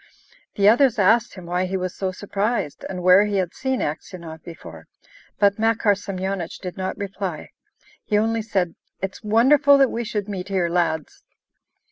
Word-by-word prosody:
The 200 0 +3
others 245 +3 +5
asked 220 +4 +3
him 185 -3 -10
why 180 +2 -1
he 190 +1 -2
was 185 -1 -3
so 190 -1 -3
surprised, 205 - -2
and 180 -2 -5
where 185 +3 +6
he 205 -1 -2
had 185 -3 -1
seen 265 -1 -2
Aksionov 160 +1 -6
before; 85 - -11 0.5
but 200 +1 +3
Makar 225 -2 +3
Semyonich 190 -3 -4
did 180 -2 -7
not 190 -1 -4
reply. 195 -5 -5 0.5
He 210 - +1
only 225 +1 +1
said: 190 -6 -1 0.3
"It's 195 0 -4
wonderful 270 +7 +5
that 270 -2 +4
we 235 - -2
should 210 -3 -3
meet 190 -3 -5
here, 185 -3 0
lads!" 165 -3 -1
195 Hz, 165 wpm, -22 LUFS, 180-215 Hz, 0.5 s, where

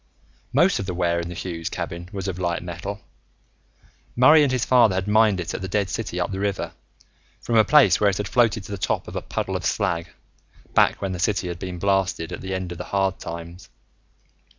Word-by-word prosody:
Most 170 +9 +3
of 100 - -4
the 90 - -3
ware 85 -1 +1
in 85 0 -4
the 90 - -7
Hughes 85 -2 -4
cabin 85 +1 -5
was 100 -1 -5
of 90 -2 -4
light 85 -1 -1
metal. 95 +4 -6 1.1
Murray 150 +6 +7
and 145 -3 +3
his 130 -1 0
father 120 -6 +5
had 95 +1 -2
mined 105 -2 +4
it 85 -1 -4
in - - -4
the 95 - -3
dead 100 -1 -1
city - - -3
up - - -1
the 95 - -4
river, 100 -1 -2 0.7
from 115 - -2
a 110 - +7
place 150 +3 +5
where 105 - +4
it 95 - -2
had 105 - -3
floated 115 -2 +2
to 100 - -10
the 100 - -4
top 90 - -1
of - - -8
a - - -2
puddle 95 - -3
of 90 - -3
slag, 85 -5 -1 0.6
back - - +3
when 95 - -1
the 90 - -4
city 95 0 0
had 85 -1 -5
been 90 -2 -5
blasted, 95 -3 0
at - - -6
the 95 0 -3
end 95 -1 -4
of 85 - -7
the - - -5
hard 95 -1 0
times. 85 +1 -8
95 Hz, 225 wpm, -23 LUFS, 90-105 Hz, 1.1 s, Murray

